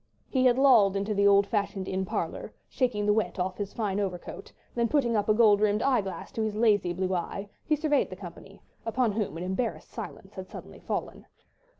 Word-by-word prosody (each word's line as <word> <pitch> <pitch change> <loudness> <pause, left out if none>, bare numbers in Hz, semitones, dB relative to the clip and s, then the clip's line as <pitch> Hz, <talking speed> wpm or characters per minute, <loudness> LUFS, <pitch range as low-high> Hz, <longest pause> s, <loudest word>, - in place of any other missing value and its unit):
He 260 -1 +2
had 250 -1 +5
lolled 235 -8 +5
into 200 +2 -1
the 200 0 +3
old 200 0 +5
fashioned 200 -3 -2
inn 190 0 -1
parlour, - - -4 0.2
shaking 240 -6 -1
the 210 - +4
wet 220 0 -1
off 185 +1 -2
his 205 -1 -3
fine 205 -3 -2
overcoat; 185 -4 -5 0.2
then 235 -1 +1
putting 245 -4 +1
up 205 0 0
a - - +6
gold 215 -3 +5
rimmed 210 0 +2
eye 260 -5 +3
glass 190 -3 -7
to 225 - -3
his 215 -1 -1
lazy 210 -5 +3
blue 185 +1 -1
eye, 195 +3 -3 0.2
he 310 - +3
surveyed 300 -1 +1
the - - -7
company, - - -12 0.2
upon 230 0 +1
whom 200 -6 -2
an 170 - -5
embarrassed 190 +6 -3
silence - - -8
had - - -7
suddenly - - -10
fallen. - - -5
210 Hz, 210 wpm, -28 LUFS, 195-235 Hz, 0.2 s, a